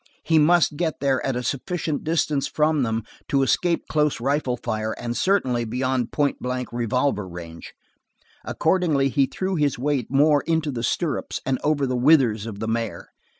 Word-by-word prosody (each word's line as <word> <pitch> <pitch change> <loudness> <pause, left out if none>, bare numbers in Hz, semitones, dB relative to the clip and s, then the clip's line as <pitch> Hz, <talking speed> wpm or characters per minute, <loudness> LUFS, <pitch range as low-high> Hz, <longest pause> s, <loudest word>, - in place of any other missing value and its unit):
He 160 -1 +3
must 160 -1 +3
get 165 -2 -1
there 135 -2 +1
at 135 - -1
a 125 - -2
sufficient 155 +3 -2
distance 155 -3 0
from 155 -1 +1
them 115 -2 -1 0.2
to 135 -1 +2
escape 170 +5 +1
close 150 -3 +1
rifle 135 0 0
fire, 110 -2 -3
and 120 0 -5
certainly 130 -12 +1
beyond 125 +1 -1
point 145 -1 0
blank 125 -1 -4
revolver 120 -3 0
range. 85 -2 -10 0.7
Accordingly 155 -7 +1
he 135 0 +2
threw 190 +4 -3
his 145 -3 +1
weight 135 -1 -1
more 145 +2 +4
into 160 -2 0
the 120 -3 -4
stirrups 150 +5 -2
and 130 -1 0
over 145 -2 +1
the 130 -1 -1
withers 125 -5 +3
of 105 -3 -6
the 110 - -4
mare. 115 -1 -3
135 Hz, 170 wpm, -23 LUFS, 120-150 Hz, 0.7 s, more